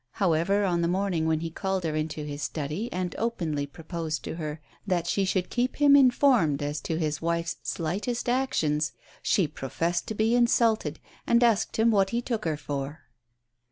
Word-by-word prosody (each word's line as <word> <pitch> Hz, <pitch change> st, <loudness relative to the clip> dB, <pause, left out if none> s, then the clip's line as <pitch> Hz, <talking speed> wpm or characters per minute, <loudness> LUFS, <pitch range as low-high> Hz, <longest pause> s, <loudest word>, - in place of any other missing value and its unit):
However, 190 Hz, +3 st, +2 dB
on 175 Hz, -2 st, +1 dB
the 170 Hz, -, +1 dB
morning 180 Hz, -3 st, 0 dB
when 160 Hz, -1 st, +1 dB
he 165 Hz, 0 st, -4 dB
called 190 Hz, +1 st, -2 dB
her 160 Hz, -2 st, -1 dB
into 155 Hz, -1 st, -3 dB
his 145 Hz, 0 st, -6 dB
study 155 Hz, +12 st, -3 dB
and 180 Hz, -2 st, -3 dB
openly 165 Hz, -11 st, -1 dB
proposed 160 Hz, +1 st, -5 dB
to -, -, -5 dB
her 155 Hz, -1 st, -4 dB, 0.3 s
that 175 Hz, -3 st, +1 dB
she 195 Hz, +3 st, +1 dB
should 185 Hz, -1 st, -1 dB
keep 245 Hz, +1 st, 0 dB
him 285 Hz, -1 st, +6 dB
informed 245 Hz, -, +4 dB
as 145 Hz, 0 st, -3 dB
to 160 Hz, -, -2 dB
his 155 Hz, -2 st, -1 dB
wife's 170 Hz, 0 st, -1 dB
slightest 200 Hz, +10 st, -2 dB
actions, 155 Hz, -, +1 dB, 0.3 s
she 185 Hz, -6 st, +2 dB
professed 165 Hz, +5 st, -2 dB
to 220 Hz, -, -4 dB
be 220 Hz, +2 st, +2 dB
insulted, 230 Hz, -9 st, +2 dB, 0.3 s
and 235 Hz, +1 st, +4 dB
asked 220 Hz, -2 st, +2 dB
him 225 Hz, +1 st, +4 dB
what 195 Hz, -3 st, +3 dB
he 235 Hz, -, 0 dB
took 235 Hz, -4 st, -3 dB
her 155 Hz, -2 st, 0 dB
for. 145 Hz, +1 st, -5 dB
170 Hz, 180 wpm, -27 LUFS, 155-220 Hz, 0.3 s, him